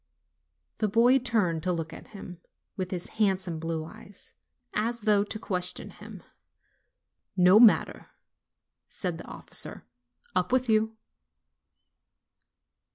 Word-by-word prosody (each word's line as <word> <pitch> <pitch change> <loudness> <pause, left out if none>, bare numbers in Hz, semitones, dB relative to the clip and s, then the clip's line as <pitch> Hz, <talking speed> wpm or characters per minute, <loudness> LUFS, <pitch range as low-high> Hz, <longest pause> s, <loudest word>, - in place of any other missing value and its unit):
The 215 - +2
boy 240 +6 +4
turned 210 -10 0
to 180 +2 -1
look 165 -2 -3
at - - -11
him, 180 -4 -10 0.3
with 185 -2 -3
his 180 -2 -4
handsome 185 -5 +1
blue 165 -1 -3
eyes, 200 +4 -13 0.4
as 230 +2 -1
though 210 -1 +3
to 215 - -4
question 180 -4 -1
him. - - -12 1.1
"No 180 +3 +7
matter," 230 -3 +4 0.8
said - - -4
the - - -10
officer; - - -3 0.5
"up - - 0
with 255 0 +2
you!" 220 0 +1
200 Hz, 115 wpm, -28 LUFS, 180-220 Hz, 1.1 s, No